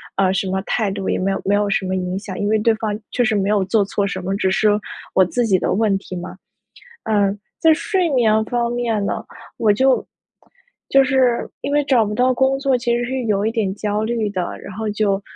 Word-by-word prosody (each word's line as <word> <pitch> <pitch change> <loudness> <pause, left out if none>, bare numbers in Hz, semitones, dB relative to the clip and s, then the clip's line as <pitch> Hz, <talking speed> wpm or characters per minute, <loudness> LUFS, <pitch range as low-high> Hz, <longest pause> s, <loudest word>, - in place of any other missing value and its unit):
呃， 190 -1 +2
什 195 0 -1
么 190 +1 -1
态 210 -1 -1
度 195 -1 -3
也 - - +1
没 195 +1 0
有 195 - -2
没 200 - +2
有 205 0 +1
什 195 -1 0
么 185 0 -1
影 185 0 -2
响。 195 -2 -7
因 205 - -1
为 220 +1 +3
对 225 +2 +3
方 215 -1 -3
确 245 - +1
实 240 -3 +1
没 200 0 0
有 210 -2 +2
做 205 +2 +2
错 200 0 -1
什 185 -1 -4
么， 190 +2 -2
只 195 -1 +1
是 215 +2 +3 0.4
我 190 - +5
自 240 +6 0
己 195 -4 +3
的 - - 0
问 210 0 +2
题 190 -1 -8
嘛。 175 0 -7 0.7
呃， 205 -2 +2 0.3
在 320 - +6
睡 365 +2 0
眠 220 -5 +3
方 240 0 -1
面 230 -4 -1
呢， - - -2 0.4
我 220 - +3
就 260 +5 +2 0.8
就 275 0 +5
是， 255 -3 +2
因 280 - -4
为 295 0 +2
找 255 -5 +3
不 210 - -3
到 250 +3 +3
工 265 +2 +1
作 270 -2 +1
其 235 0 0
实 240 - -1
是 260 +1 -3
有 205 -2 0
一 220 - +1
点 210 -5 -1
焦 210 +1 -2
虑 220 -1 -1
的， 185 -3 -3
然 - - -8
后 220 +2 -3
就 205 -2 0
215 Hz, 255 characters per minute, -20 LUFS, 195-240 Hz, 0.8 s, 在